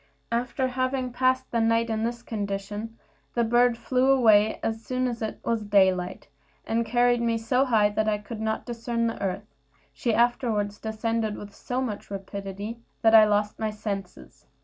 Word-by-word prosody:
After 250 +2 0
having 255 0 -1
passed 255 +1 +1
the 230 - +1
night 230 0 +2
in 220 0 -1
this 235 +1 -3
condition, 205 +1 -4 0.4
the 235 - +3
bird 240 +1 +3
flew 255 +2 +1
away 220 -5 +5
as 225 0 -2
soon 255 +2 -1
as 235 -2 -4
it 220 - -4
was 230 -1 0
daylight, 190 -3 +2 0.4
and 230 +1 0
carried 245 0 +3
me 230 -1 +1
so 250 +4 +1
high 220 -5 +3
that 215 +1 0
I 210 - +1
could 215 +1 -8
not 220 0 -2
discern 235 -1 -2
the 230 - -3
earth; 195 +1 -2 0.5
she 235 - -1
afterward 230 -3 +1
descended 220 0 -1
with 205 0 -9
so 250 +5 -3
much 225 -6 -4
rapidity 200 +2 -6 0.2
that 225 0 +5
I 220 -1 +9
lost 210 0 0
my 220 -1 0
senses. 200 -3 -7
225 Hz, 170 wpm, -26 LUFS, 210-240 Hz, 0.5 s, I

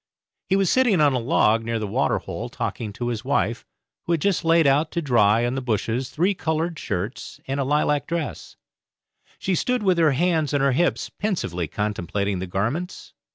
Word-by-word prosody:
He 190 - +3
was 195 -2 +2
sitting 245 -8 +3
on 145 -2 +4
a 125 - +1
log 115 -4 +2
near 115 0 -2
the 110 - -3
water 100 - +1
hole - - -6
talking 110 -3 -4
to 120 +3 -3
his 115 -3 -3
wife, - - -1 0.4
who 170 - +2
had 165 - 0
just 200 0 +1
laid 165 -1 +4
out 145 +3 +3
to 170 - 0
dry 120 -6 +3
on 120 - -1
the 135 - -2
bushes 120 +1 -1
three 180 +6 +1
coloured 160 -1 -2
shirts 100 +8 -4
and 135 +1 -2
a - - +1
lilac 145 +1 +1
dress. 165 -4 -4 0.8
She 190 - -1
stood 250 +6 0
with 185 -3 +3
her 155 -4 +4
hands 160 -1 +1
on 140 - +2
her 140 0 +3
hips, 175 +7 0
pensively 95 - -2
contemplating 100 -1 -2
the 95 - -4
garments. 120 - -3
140 Hz, 195 wpm, -23 LUFS, 115-170 Hz, 0.8 s, on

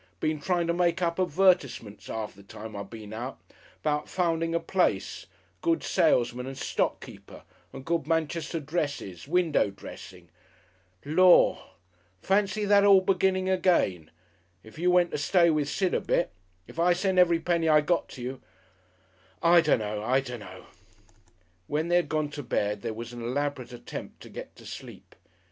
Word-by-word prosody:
Been 155 -1 -1
trying 175 +1 0
to 170 - 0
make 175 +1 +1
up 170 +1 -1
advertisements 175 - +1
'arf 110 -1 -4
the 100 - -16
time 105 +2 -10
I 100 - -4
been 110 0 -9
out 120 +4 -6 0.4
'bout 150 -1 -1
finding 165 -2 0
a - - +2
place, 110 - -1 0.3
good 165 0 +1
salesman 125 -7 +1
and 135 0 -7
stock - - -1
keeper, - - -13 0.3
and 130 - -10
good 165 -4 -1
Manchester 165 +1 -1
dresses, 145 - -4
window 170 - +2
dressing 100 - -12 0.8
Lor'! 180 +4 +5 0.6
Fancy 200 - +1
that 200 0 +5
all 200 -2 +7
beginning 185 0 +1
again!... 170 - +1 0.5
If 110 +7 -14
you 180 +1 +2
went 180 -1 +3
to - - -2
stay 170 +3 +4
with 150 -2 0
Sid 185 +2 0
a - - +1
bit - - 0 0.3
if 160 - -11
I 175 +1 +4
sent 185 +1 +1
every 170 -2 +5
penny 165 -1 +1
I 150 -1 +6
got 170 +3 0
to 125 - -9
you 130 +1 -5 1.0
I 170 0 +6
dunno! 105 -9 0
I 130 +5 +2
dunno!" 105 -8 -8 1.0
When 155 +3 -1
they 175 - +4
had 175 - 0
gone 155 -2 -1
to 145 0 -6
bed 105 -5 -1
there 110 - -4
was 115 +1 -7
an 120 - -7
elaborate 130 +1 -3
attempt 120 -1 -8
to - - -12
get - - -9
to - - -15
sleep.... - - -10
155 Hz, 165 wpm, -27 LUFS, 120-175 Hz, 1.0 s, all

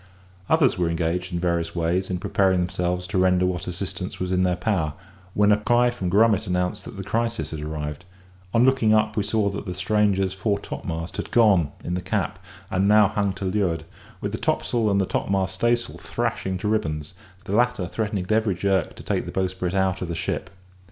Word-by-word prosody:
Others 150 - +3
were 85 -2 +2
engaged 85 +2 -1
in 85 - -1
various 85 -1 -1
ways 85 +2 0
in 90 - -1
preparing 95 0 +2
themselves 90 0 -1
to 95 0 -1
render 90 0 +3
what 90 -1 -2
assistance 90 0 -4
was 90 0 -2
in 90 0 +2
their 90 -1 +2
power, 90 -5 0 0.4
when 105 0 +4
a 105 - +5
cry 120 +3 +3
from 95 -7 -3
Grummet 105 +1 +3
announced 90 +3 -1
that - - -9
the 95 - -4
crisis 115 +3 -1
had 80 -2 -5
arrived; 75 0 -4 0.5
on 115 +4 +4
looking 130 -5 +4
up 110 0 +2
we 105 - +2
saw 105 0 +1
that 100 +1 -6
the 90 - -4
stranger's 95 0 +1
fore 100 +2 0
topmast 80 +1 -5
had - - -4
gone 100 -10 +4
in 85 - -3
the 90 - -1
cap; 90 - -2 0.3
and 95 +2 +2
now 105 -1 +6
hung 100 -1 0
to 95 0 -5
leeward, 95 -4 0 0.4
with - - -2
the - - -4
topsail 115 -3 +1
and 100 -2 +2
topmast 95 -1 0
staysail 120 +4 0
thrashing 95 -1 -2
to 105 - -3
ribbons; 75 -8 -1 0.3
the 100 - -2
latter 120 -5 +2
threatening 105 0 -2
at 90 - -6
every 110 -3 +2
jerk 95 -2 0
to - - -11
take - - -1
the - - -5
bowsprit 95 -1 -2
out 95 -1 +1
of 90 - -2
the 85 - -3
ship. 85 +3 -3
95 Hz, 205 wpm, -24 LUFS, 90-105 Hz, 0.5 s, now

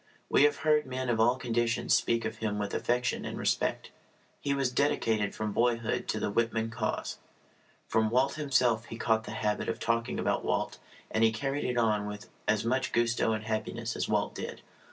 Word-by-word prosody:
We - - +6
have 445 - +2
heard 150 -2 +4
men 130 0 -3
of 115 -2 +1
all 120 +3 +5
conditions 120 -2 0
speak 115 -1 +2
of 110 - -3
him 105 -2 -2
with 105 -1 -3
affection 125 +1 0
and - - -5
respect. - - 0 0.5
He 140 - -2
was 135 -2 +1
dedicated 115 -7 +1
from 110 -1 -2
boyhood 115 +1 0
to - - -1
the - - -1
Whitman 115 0 0
cause. 115 - -3 0.7
From 110 -1 +2
Walt 130 +4 +2
himself 125 -6 +2
he 115 - -8
caught 110 -1 +1
the - - -6
habit 105 -1 -1
of 115 -1 -2
talking 115 +1 0
about - - 0
Walt, - - -1 0.3
and 110 - +2
he 110 - +5
carried 135 +5 -2
it 125 -1 -1
on 105 -3 +2
with 105 0 -8 0.2
as 110 0 +2
much 130 +2 0
gusto 120 -1 +2
and 110 0 -3
happiness 110 0 -3
as - - -2
Walt - - +1
did. - - -6
115 Hz, 195 wpm, -30 LUFS, 110-125 Hz, 0.7 s, We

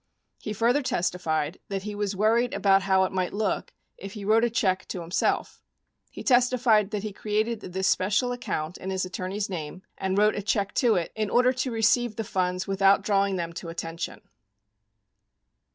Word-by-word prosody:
He 215 - -5
further 235 +6 +2
testified 170 - -1
that 195 -1 -4
he 210 0 -5
was 205 -1 -2
"worried 230 +6 +2
about 195 -1 +4
how 190 0 +3
it 185 - -1
might 185 -1 -1
look 210 -2 -1 0.3
if 195 0 -8
he 205 -2 -7
wrote 220 +2 +4
a 240 - +3
check 190 -5 0
to 180 - -5
him 165 - -11
self." - - 0 0.5
He - - -9
testified 245 -5 +3
that 210 -2 -3
he 215 -2 -4
created 215 +2 -1
this 190 +1 -2
special 210 +7 +2
account 180 -10 -4
in 190 - -5
his 190 -1 -1
attorney's 185 +2 -3
name 180 0 -6 0.2
and 190 0 -1
wrote 210 +1 +4
a 205 - -3
check 200 0 -1
to 240 -4 +4
it 170 -2 -1
in 215 -1 -1
order 250 +1 +4
to 255 +1 -2
receive 225 0 +2
the 225 - -3
funds 185 -2 -1
"without 195 0 +3
drawing 200 -1 +2
them 170 -2 -3
to 170 0 -7
attention." 165 0 -5
200 Hz, 185 wpm, -26 LUFS, 185-220 Hz, 0.5 s, about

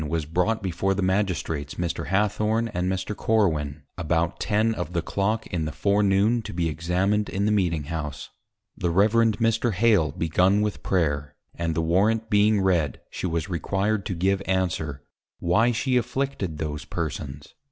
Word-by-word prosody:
_ 75 - -4
was 80 -1 -1
brought 90 +8 0
before 95 +1 0
the 100 - -1
Magistrates 95 -6 -1
Mr. 85 -1 -3
Hathorne 105 +4 +1
and 90 -2 -1
Mr. 95 +2 -3
Corwin, 80 -12 0 0.2
about 85 +1 0
Ten 110 +1 +1
of 90 -4 -5
the 85 -2 0
Clock 110 +6 -1
in 80 -3 0
the 75 - -3
Forenoon, 100 +6 +2
to - - -8
be 85 -1 0
Examined 90 +6 0
in 100 +1 -1
the 105 - +2
Meeting 90 -7 +1
House, 75 -2 -5 0.4
the 90 - -1
Reverend 110 +4 +3
Mr. 115 0 +1
Hale 100 -7 +3
begun 90 +5 +2
with 105 -1 -3
Prayer, 75 -6 0 0.2
and 85 -1 -2
the 80 - 0
Warrant 110 +7 +1
being 105 0 +4
read, 85 -8 +1
she - - -3
was 85 0 -2
required 100 +4 -1
to 95 - -2
give 95 +3 +1
Answer, 80 -6 -1 0.4
_Why 110 +8 +3
she 125 +2 +1
afflicted 125 - -2
those 75 -1 -4
persons? 75 -4 -5
95 Hz, 165 wpm, -25 LUFS, 80-105 Hz, 0.4 s, being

